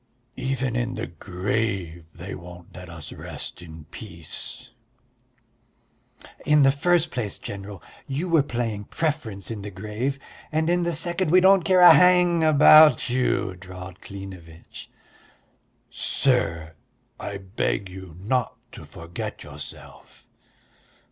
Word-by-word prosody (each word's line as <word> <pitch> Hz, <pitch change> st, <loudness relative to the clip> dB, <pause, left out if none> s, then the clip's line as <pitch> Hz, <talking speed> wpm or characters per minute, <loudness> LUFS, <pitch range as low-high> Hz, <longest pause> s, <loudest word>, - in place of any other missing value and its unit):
"Even 130 Hz, -2 st, -2 dB
in 120 Hz, 0 st, -1 dB
the -, -, -3 dB
grave 90 Hz, 0 st, -3 dB
they 90 Hz, +3 st, -7 dB
won't 90 Hz, 0 st, -11 dB
let 90 Hz, -1 st, -10 dB
us 85 Hz, -3 st, -9 dB
rest -, -, -8 dB
in 80 Hz, -3 st, -11 dB
peace." 85 Hz, -7 st, -9 dB, 1.7 s
"In 150 Hz, -1 st, +4 dB
the 135 Hz, -, +6 dB
first 175 Hz, +4 st, +1 dB
place, 110 Hz, -5 st, -3 dB
General, 100 Hz, -1 st, -8 dB, 0.2 s
you 145 Hz, +7 st, -3 dB
were 165 Hz, -3 st, +4 dB
playing 115 Hz, -6 st, -3 dB
preference 130 Hz, -12 st, -3 dB
in 110 Hz, -3 st, -5 dB
the 105 Hz, -, -6 dB
grave, 105 Hz, +8 st, -4 dB, 0.3 s
and 160 Hz, +2 st, +1 dB
in 175 Hz, 0 st, +2 dB
the 170 Hz, 0 st, 0 dB
second 170 Hz, +2 st, 0 dB
we 180 Hz, +3 st, +6 dB
don't 190 Hz, +1 st, +6 dB
care 185 Hz, +1 st, +3 dB
a 175 Hz, -, +11 dB
hang 180 Hz, -2 st, +5 dB
about 155 Hz, -2 st, +7 dB
you," 125 Hz, -6 st, 0 dB
drawled 90 Hz, 0 st, -10 dB
Klinevitch. 95 Hz, -5 st, -11 dB, 1.0 s
"Sir, 85 Hz, -, 0 dB, 0.5 s
I 100 Hz, -, -5 dB
beg 95 Hz, 0 st, -2 dB
you 95 Hz, -3 st, -11 dB
not 115 Hz, +6 st, -1 dB, 0.2 s
to -, -, -11 dB
forget 85 Hz, +1 st, -7 dB
yourself." -, -, -12 dB
110 Hz, 125 wpm, -24 LUFS, 90-150 Hz, 1.7 s, a